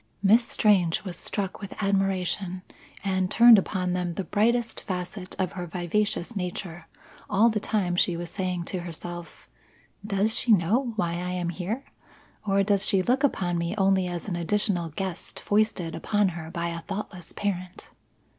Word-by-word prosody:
Miss 225 +4 +5
Strange 185 -6 +3
was 185 -3 -5
struck 195 +3 -3
with 200 - -7
admiration, 195 -2 0 0.4
and 190 -2 0
turned 230 +1 +8
upon 180 -1 -1
them 180 -2 -2
the 195 - -2
brightest 230 +4 +1
facet 185 0 -4
of 185 -1 0
her 180 -2 -5
vivacious 180 +4 -1
nature 175 -2 -5 0.4
all 210 +4 +5
the 215 -1 0
time 200 -4 0
she 175 -1 +2
was 170 0 -6
saying 180 -2 -2
to 185 +2 -4
herself: 175 0 -8 0.6
"Does 210 +1 +1
she 235 - +4
know 225 +7 +2
why 175 -6 0
I 180 +1 -3
am 175 -1 -1
here? 195 +10 -4 0.6
Or 195 0 +3
does 200 -1 +2
she 195 -3 +3
look 255 +7 +1
upon 180 -10 +1
me 170 +4 -2
only 190 -2 +3
as 175 +1 -4
an 185 - -2
additional 175 0 0
guest 185 +2 -5
foisted 205 -5 +1
upon 205 -2 +1
her 165 -2 -7
by 170 0 -2
a 170 0 -4
thoughtless 195 -2 -6
parent?" 185 -2 -4
190 Hz, 165 wpm, -26 LUFS, 175-205 Hz, 0.6 s, turned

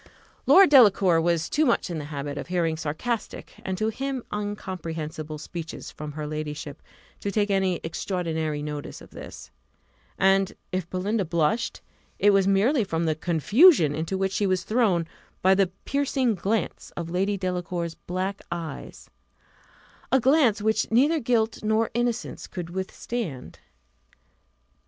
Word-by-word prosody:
Lord 380 -4 +7
Delacour 195 - +6
was 170 -1 +1
too 305 - +1
much 240 - +1
in 165 - -3
the 150 - -6
habit 145 -1 -5
of - - -6
hearing 170 -3 0
sarcastic, 185 +10 -4
and 190 -1 -3
to 215 +2 0
him 265 +2 -3
incomprehensible 165 -7 -5
speeches 160 +1 -7
from 150 -1 -7
her 150 0 -5
ladyship, 150 -1 -5 0.4
to 200 - -3
take 205 0 +1
any 190 -2 +1
extraordinary 160 -3 -2
notice 150 -1 -6
of - - -14
this; - - -10 0.7
and 195 0 +3 0.2
if 185 -2 -3
Belinda 195 +3 -1
blushed, 170 +7 0 0.4
it 205 - +5
was 195 -1 +3
merely 220 +7 +3
from 165 -4 -1
the 160 - +2
confusion 175 - +5
into 160 +5 -2
which 190 0 0
she 200 +1 0
was 185 -1 +1
thrown 210 -8 +2 0.4
by 190 +1 +6
the 195 0 +3 0.2
piercing 275 -3 +1
glance 205 +3 -2
of 170 -1 -4
Lady 195 +3 0
Delacour's 180 -2 -3
black 185 +4 -4
eyes 170 -2 -6 1.0
a 265 - +5
glance 250 -5 +3
which 220 0 +1
neither 285 +8 +3
guilt 230 -3 0
nor 220 +1 +1
innocence 240 0 -2
could 175 -3 -6
withstand. 190 - -5
190 Hz, 140 wpm, -25 LUFS, 165-220 Hz, 1.0 s, Lord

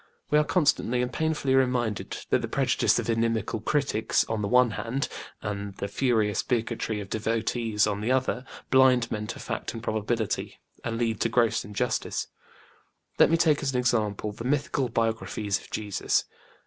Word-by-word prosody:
We 150 - +6
are - - +4
constantly 135 -7 +2
and 125 - -4
painfully 155 -4 0
reminded 125 -5 0
that - - +3
the - - -3
prejudice - - +2
of - - -2
inimical 115 -1 0
critics, 115 -3 +1
on 110 -1 -2
the 100 - -1
one 125 +1 +4
hand, 115 +7 -2 0.4
and 100 -1 -4
the 100 - -4
furious 110 -4 +1
bigotry 115 -2 -1
of 100 - -6
devotees, 110 0 0
on 105 -1 -2
the 115 +4 0
other, 130 -1 +1 0.3
blind 130 -3 +5
men 105 -1 -3
to - - -5
fact - - -4
and 115 - -7
probability, 110 0 -2 0.2
and 115 -1 -2
lead 115 -2 0
to 115 - +1
gross 115 -2 +2
injustice. 110 +3 -2 0.9
Let - - +7
me 165 - +4
take 155 -3 +3
as 135 -2 -1
an - - +3
example 110 -4 0
the 110 - -8
mythical 135 -1 0
biographies 110 -3 -1
of - - -15
Jesus. 105 -3 0
115 Hz, 170 wpm, -27 LUFS, 105-125 Hz, 0.9 s, Let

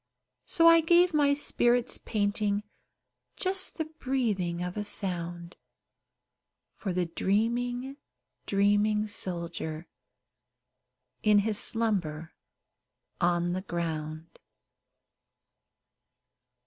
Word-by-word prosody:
So 330 - +2
I 330 0 +8
gave 345 +2 +4
my 285 -2 +3
spirit's 245 -3 +1
painting 205 -1 -1 0.7
Just 375 0 0
the 320 - -1
breathing 230 - -2
of 180 0 -5
a 210 - -2
sound, 175 -4 -3 1.2
For 195 - -4
the 180 0 0
dreaming, 240 +9 -1 0.5
dreaming 205 +1 +2
soldier, 170 -6 -4 1.4
In 210 -1 +4
his 215 -2 0
slumber 180 -9 -1 0.9
on 175 0 +1
the 185 - -2
ground. 160 -3 -5
205 Hz, 85 wpm, -28 LUFS, 175-245 Hz, 1.4 s, I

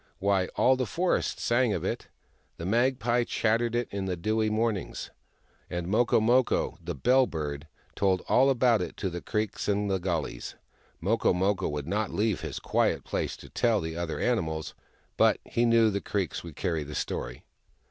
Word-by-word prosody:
" - - -41
Wliy, 100 -2 +2
all 130 - +4
the 130 -2 -2
forest 180 +8 0
sang 120 -2 +2
of - - -2
it! - - -3 0.5
The 85 - -6
mag 120 +6 +2
pie 120 +1 +1
chattered 115 +1 0
it 120 -1 0
in 100 -1 -3
the 95 -1 -1
dewy 110 +4 0
mornings, 110 -2 -2 0.6
and 85 -1 -3
Moko 110 +7 +3
Moko, 120 +3 +2
the 85 0 -4
Bell 125 - +4
Bird, 75 -2 -4 0.3
told 95 -2 +1
all 135 +2 +5
about 120 -4 +3
it 90 - -5
to 95 - -2
the 85 0 -5
creeks 105 -1 -2
in 100 0 +1
the 95 -1 +1
gullies. 85 -9 -3 0.5
Moko 110 +2 +2
Moko 95 +2 +1
w^ould 75 -1 -4
not 105 +4 -1
leave 105 -2 0
his - - -5
quiet - - +1
places - - -3
to - - -13
tell 115 -3 +2
the 80 -2 -4
other 85 -2 -3
animals, 80 -10 -1 0.4
but - - +5
he 120 - +1
knew 115 -2 +5
the 100 0 -2
creeks 100 -4 -2
would 85 -4 -9
carry 80 -1 -1
the 75 +1 -8
story. - - -4
105 Hz, 185 wpm, -28 LUFS, 85-115 Hz, 0.6 s, all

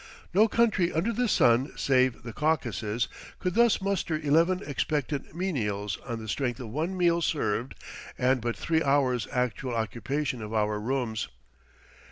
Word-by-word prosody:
No 210 +5 +6
country 215 -6 +2
under 190 +9 0
the 245 +2 +1
sun 125 - +3
save 130 -3 +2
the 115 -2 -7
Caucasus 120 - 0 0.3
could 180 - -2
thus 235 0 +4
muster 190 -5 0
eleven 165 +6 +2
expectant 145 0 -2
menials 105 - -2
on 120 -2 -3
the 110 -1 -8
strength 125 +2 -1
of 125 -4 -6
one 160 - -2
meal 170 -1 +3
served 125 -6 -1 0.4
and 130 0 +2
but 120 0 -2
three 160 -1 +1
hours 135 -6 +2
actual 125 0 -1
occupation 125 +4 -2
of 110 +1 -5
our 105 -1 +1
rooms. 115 - -2
135 Hz, 150 wpm, -28 LUFS, 115-170 Hz, 0.4 s, No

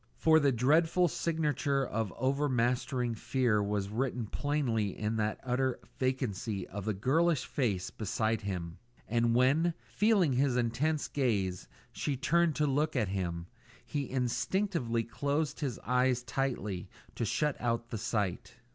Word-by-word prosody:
For 160 0 +5
the 145 -2 +3
dreadful 160 +8 +3
signature 150 -4 0
of 110 -4 -2
overmastering 125 -2 +1
fear 115 -1 +1
was 100 -1 -1
written 120 +1 -1
plainly 115 -5 -1
in 110 +1 -1
that 105 -1 -1
utter 130 0 0 0.2
vacancy 115 -6 -1
of 100 +1 -6
the 110 - 0
girlish 155 - +2
face 105 -10 -1
beside 110 +1 -1
him; 90 -5 -4 0.3
and 115 0 +2
when, 150 +7 +3
feeling 200 - +3
his 130 0 +2
intense 130 +6 0
gaze, 100 -10 -1 0.2
she 140 -3 -2
turned 170 +3 +2
to 150 - +2
look 150 +2 +1
at 110 -7 +1
him, 85 -3 -2 0.4
he 140 -4 -3
instinctively 130 - 0
closed 140 +6 -2
his 135 -7 -2
eyes 125 +1 +2
tightly 105 -7 -2 0.2
to - - -3
shut 150 +6 0
out 115 -1 -1
the 115 - -3
sight. 100 -4 -2
125 Hz, 140 wpm, -31 LUFS, 110-145 Hz, 0.4 s, For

